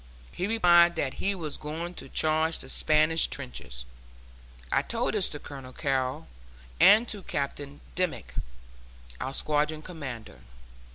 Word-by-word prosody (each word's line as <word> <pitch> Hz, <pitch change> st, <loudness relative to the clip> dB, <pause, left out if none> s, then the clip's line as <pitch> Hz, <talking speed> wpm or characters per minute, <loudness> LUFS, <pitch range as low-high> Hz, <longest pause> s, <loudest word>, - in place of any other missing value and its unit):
He 185 Hz, -, -2 dB
replied 175 Hz, -5 st, +6 dB
that 140 Hz, -5 st, -1 dB
he 200 Hz, 0 st, +1 dB
was 155 Hz, -5 st, -5 dB
going 165 Hz, +4 st, -5 dB
to -, -, -9 dB
charge 160 Hz, +1 st, +2 dB
the 130 Hz, -, -8 dB
Spanish 155 Hz, +3 st, +3 dB
trenches. 65 Hz, -, -5 dB, 0.9 s
I -, -, +4 dB
told -, -, -1 dB
this -, -, +1 dB
to -, -, -4 dB
Colonel 135 Hz, -2 st, -9 dB
Carrol, 130 Hz, -, -1 dB, 0.5 s
and 220 Hz, +4 st, +7 dB
to 205 Hz, -3 st, -4 dB
Captain 145 Hz, -2 st, -4 dB
Dimmick, 180 Hz, -2 st, -2 dB, 0.9 s
our 130 Hz, -, -3 dB
squadron 155 Hz, +1 st, 0 dB
commander. 130 Hz, -, -7 dB
155 Hz, 130 wpm, -28 LUFS, 135-175 Hz, 0.9 s, and